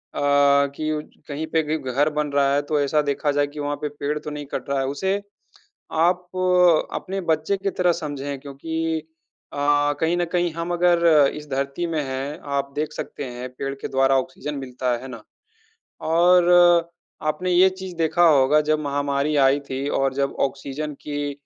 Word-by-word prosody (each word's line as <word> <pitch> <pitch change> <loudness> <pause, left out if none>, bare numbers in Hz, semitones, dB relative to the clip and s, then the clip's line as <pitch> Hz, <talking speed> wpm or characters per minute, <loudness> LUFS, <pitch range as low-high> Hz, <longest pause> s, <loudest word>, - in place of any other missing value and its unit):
कि 145 +2 +1
कहीं 150 +2 -4
पे 160 - +3
भी 155 +1 -1
घर 145 +4 +2
बन 150 -1 -2
रहा 140 -1 +2
है, 145 - +2
तो 145 +1 -1
ऐसा 150 +2 +2
देखा 145 +1 0
जाए 145 0 +1
कि 150 +1 -10
वहाँ 145 0 -2
पे 150 - -2
पेड़ 145 +1 -3
तो 150 - -7
नहीं 150 -1 -6
कट - - -4
रहा 140 0 0
है। 135 - 0
उसे 190 +8 -1 0.7
आप 175 +3 +2 0.7
अपने 195 +1 -4
बच्चे 160 +5 +1
की 195 +1 -2
तरह 180 -2 +2
समझें 145 -4 -5
क्योंकि 160 +3 -3 0.5
अ, - - -8 0.4
कहीं 165 +2 +1
न 175 - +1
कहीं 175 -2 +1
हम 165 +1 -4
अगर 175 -1 +3 0.3
इस 150 0 -8
धरती 140 +5 -2
में 160 -2 -1
हैं, 135 +2 -4
आप 140 -1 -3
देख 150 0 -2
सकते 145 - -6
हैं 125 0 -6
पेड़ 135 0 -3
के 135 - -7
द्वारा 135 0 +3
ऑक्सीज़न 150 +3 -6
मिलता 125 -1 -3
है। 120 - -2
है 130 - -8
ना? 115 -4 -9 0.8
और 175 +2 +4 0.8
आपने 180 +5 -3
ये 185 +2 +6
चीज़ 190 -1 -8
देखा 170 +1 +2
होगा 145 0 +4
जब 155 - +3
महामारी 145 0 -1
आई 140 +2 +3
थी 135 +2 -2
और 135 -2 0
जब 140 0 -1
ऑक्सीज़न 140 +2 -6
की 145 -1 -3
145 Hz, 180 wpm, -23 LUFS, 140-160 Hz, 0.8 s, ये